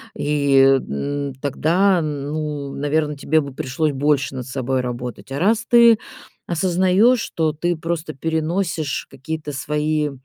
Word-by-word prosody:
И, 145 -1 +1
м, 135 - +1
тогда, 175 +6 +2
ну, 150 -1 -4
наверное, 150 +1 -1
тебе 155 +2 +1
бы 140 -2 -7
пришлось 150 +2 -1
больше 145 0 0
над 130 -2 -5
собой 130 0 -1
работать. 125 +1 -6
А 135 - -3
раз 220 +6 +2
ты 235 -2 +7 0.5
осознаешь, 185 +7 +2
то 160 -2 +1
ты 175 +3 -1
просто 165 -1 -3
переносишь 160 +1 -2
какие-то 150 +2 -6
свои 150 +2 -1
150 Hz, 130 wpm, -21 LUFS, 140-165 Hz, 0.5 s, ты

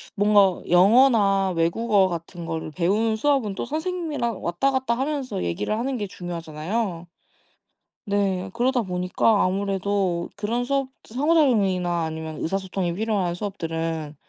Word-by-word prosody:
뭔가 205 -2 +4
영어나 195 0 +5
외국어 190 +4 +2
같은 170 0 -6
거를 160 -1 -4
배우는 210 +7 +1
수업은 250 -6 +1
또 - - -3
선생님이랑 310 - -3
왔다 175 +11 0
갔다 260 -3 0
하면서 270 - -2
얘기를 85 - -2
하는 255 +2 -2
게 205 -2 -3
중요하잖아요. 175 +2 -4 1.0
네. 195 -2 0
그러다 250 +1 +1
보니까 185 +2 +1
아무래도 195 -2 0
그런 220 +4 -1
수업 275 0 0
상호작용이나 215 - +2
아니면 160 -1 -5
의사소통이 190 0 -2
필요한 200 -4 -1
수업들은 165 -5 -4
195 Hz, 330 characters per minute, -24 LUFS, 175-235 Hz, 1.0 s, 영어나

